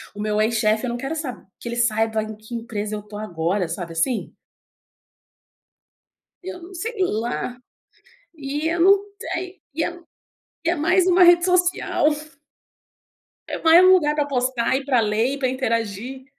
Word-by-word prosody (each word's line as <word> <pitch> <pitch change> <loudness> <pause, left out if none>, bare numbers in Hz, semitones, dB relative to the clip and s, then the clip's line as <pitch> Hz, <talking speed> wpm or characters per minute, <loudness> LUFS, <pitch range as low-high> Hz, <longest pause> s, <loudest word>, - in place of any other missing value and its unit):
O 210 - -6
meu 210 0 0
ex-chefe 220 +1 +1
eu - - -2
não 240 - -3
quero 270 +5 -4
sab 275 -8 -6
que - - -8
ele 235 - -3
saiba 225 -2 +1
em 215 0 -7
que 220 +3 -9
empresa 215 -2 -4
eu 210 - -5
tô 210 0 -10
agora, 180 -2 -1
sabe, 170 0 -5
assim? 190 +9 -1 2.1
Eu 360 -2 -7
não 370 +2 -11
sei 455 +7 -4
lá. 245 -3 -2 0.8
E 295 +2 -3
eu 340 +1 -1
não 395 +2 +6 0.2
tenho 375 0 -5 0.2
e 320 - -2
eu 345 -1 -6 0.6
é 335 +1 +2
mais 350 +4 +3
uma 360 0 +6
rede 345 0 +6
social. 360 -4 +2 1.4
É - - -4
mais 330 +2 +7
um 370 - +8
lugar 300 -5 +3
para 295 -1 0
postar, 255 -2 0
e 270 - -4
para 260 -4 +3
ler, 225 +5 +1
e - - -6
para 260 -2 0
interagir. 245 0 -2
255 Hz, 165 wpm, -22 LUFS, 215-330 Hz, 2.1 s, um